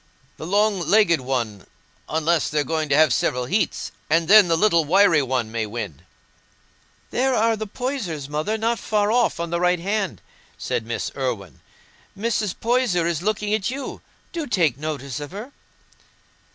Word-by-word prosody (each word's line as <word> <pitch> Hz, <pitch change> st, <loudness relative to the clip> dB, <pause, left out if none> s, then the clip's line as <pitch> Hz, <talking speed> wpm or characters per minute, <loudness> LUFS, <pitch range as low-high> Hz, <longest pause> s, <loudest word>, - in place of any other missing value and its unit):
"The 160 Hz, -, -7 dB
long 205 Hz, +1 st, +2 dB
legged 175 Hz, -2 st, +3 dB
one, 120 Hz, -6 st, -3 dB, 0.4 s
unless 160 Hz, 0 st, +1 dB
they're 150 Hz, -1 st, 0 dB
going 155 Hz, +2 st, -2 dB
to 140 Hz, -, +3 dB
have 155 Hz, -5 st, +5 dB
several 125 Hz, 0 st, 0 dB
heats, 185 Hz, -, -1 dB, 0.2 s
and 165 Hz, 0 st, +2 dB
then 205 Hz, 0 st, +8 dB
the 165 Hz, -1 st, +2 dB
little 170 Hz, -3 st, +3 dB
wiry 170 Hz, -1 st, +4 dB
one 125 Hz, -4 st, -1 dB
may 110 Hz, -1 st, -2 dB
win." 105 Hz, -, -6 dB, 1.1 s
"There 260 Hz, +1 st, +1 dB
are 225 Hz, 0 st, +2 dB
the 215 Hz, 0 st, -5 dB
Poysers, 200 Hz, -, -4 dB
Mother, 155 Hz, +9 st, -2 dB
not 230 Hz, +1 st, 0 dB
far 210 Hz, -1 st, 0 dB
off 240 Hz, -5 st, +2 dB
on 170 Hz, 0 st, -3 dB
the 170 Hz, -, 0 dB
right 180 Hz, 0 st, +3 dB
hand," 200 Hz, +2 st, -2 dB, 0.4 s
said 115 Hz, -, -3 dB
Miss 115 Hz, -, -3 dB
Irwine. 115 Hz, -, -4 dB, 0.6 s
"Mrs. 215 Hz, -2 st, -1 dB
Poyser 230 Hz, -8 st, +1 dB
is 170 Hz, -2 st, -1 dB
looking 210 Hz, +1 st, -1 dB
at 215 Hz, -1 st, 0 dB
you. 270 Hz, +2 st, -6 dB, 0.3 s
Do 330 Hz, -3 st, -4 dB
take 170 Hz, -, +2 dB
notice 140 Hz, -2 st, -5 dB
of 145 Hz, -1 st, -6 dB
her." 220 Hz, +7 st, -7 dB
170 Hz, 165 wpm, -23 LUFS, 140-215 Hz, 1.1 s, then